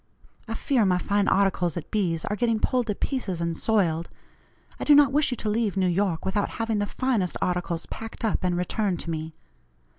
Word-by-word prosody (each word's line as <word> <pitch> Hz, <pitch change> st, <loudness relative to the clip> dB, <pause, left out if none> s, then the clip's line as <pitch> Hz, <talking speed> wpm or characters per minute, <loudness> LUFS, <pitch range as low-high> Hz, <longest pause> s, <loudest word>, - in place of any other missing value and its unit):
I 225 Hz, -, -4 dB
fear 250 Hz, -1 st, +1 dB
my 185 Hz, -2 st, +3 dB
fine 200 Hz, +2 st, +1 dB
articles 185 Hz, -3 st, +2 dB
at 165 Hz, -, -7 dB
B.'s 175 Hz, -6 st, 0 dB
are 210 Hz, -, -1 dB
getting 230 Hz, 0 st, +1 dB
pulled 250 Hz, +1 st, +1 dB
to 210 Hz, -, -1 dB
pieces 200 Hz, -, -2 dB
and 170 Hz, -1 st, -1 dB
soiled. 170 Hz, -6 st, +1 dB, 0.7 s
I -, -, -3 dB
do 295 Hz, -, +6 dB
not 290 Hz, -1 st, +6 dB
wish 295 Hz, +2 st, +3 dB
you 250 Hz, -, -2 dB
to 215 Hz, -, -4 dB
leave 210 Hz, -2 st, 0 dB
N.Y. 185 Hz, -1 st, +1 dB
without 200 Hz, +1 st, 0 dB
having 225 Hz, -2 st, 0 dB
the 205 Hz, -, 0 dB
finest 230 Hz, -9 st, -1 dB
articles 175 Hz, -2 st, -1 dB
packed 225 Hz, 0 st, -6 dB
up 215 Hz, -, 0 dB
and 180 Hz, -1 st, +1 dB
returned 180 Hz, 0 st, -1 dB
to 170 Hz, -, -4 dB
me. 160 Hz, 0 st, -5 dB
200 Hz, 200 wpm, -26 LUFS, 175-225 Hz, 0.7 s, do